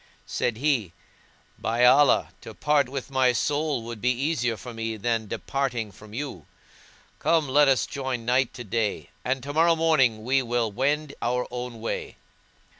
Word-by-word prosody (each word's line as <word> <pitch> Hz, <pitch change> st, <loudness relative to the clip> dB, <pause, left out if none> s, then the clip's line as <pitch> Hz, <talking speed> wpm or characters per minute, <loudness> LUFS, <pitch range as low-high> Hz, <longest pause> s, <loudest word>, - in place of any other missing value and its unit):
Said 120 Hz, -, -1 dB
he, 125 Hz, -, 0 dB, 0.7 s
"By 115 Hz, +2 st, +2 dB
Allah, 135 Hz, +3 st, +5 dB
to -, -, -10 dB
part 145 Hz, -3 st, +2 dB
with 135 Hz, 0 st, -6 dB
my 130 Hz, -2 st, +3 dB
soul 145 Hz, 0 st, 0 dB
would 115 Hz, -2 st, -7 dB
be 125 Hz, -, +2 dB
easier 125 Hz, -3 st, 0 dB
for 120 Hz, +5 st, -9 dB
me 115 Hz, -1 st, -4 dB
than 115 Hz, 0 st, -1 dB
departing 120 Hz, -3 st, -2 dB
from 105 Hz, +2 st, -15 dB
you: 135 Hz, -4 st, -6 dB, 0.7 s
come 160 Hz, -3 st, +2 dB
let 145 Hz, +2 st, +5 dB
us 135 Hz, -4 st, +3 dB
join 130 Hz, -4 st, -4 dB
night 125 Hz, +1 st, +2 dB
to 125 Hz, -, -6 dB
day, 110 Hz, 0 st, -2 dB
and 130 Hz, 0 st, -1 dB
tomorrow 160 Hz, +4 st, +3 dB
morning 135 Hz, -9 st, +2 dB
we 135 Hz, +3 st, +2 dB
will 120 Hz, -2 st, 0 dB
each 100 Hz, -, -15 dB
wend 145 Hz, +3 st, 0 dB
our 125 Hz, +1 st, 0 dB
own 125 Hz, -2 st, -6 dB
way." 115 Hz, -, -4 dB
125 Hz, 165 wpm, -26 LUFS, 115-140 Hz, 0.7 s, Allah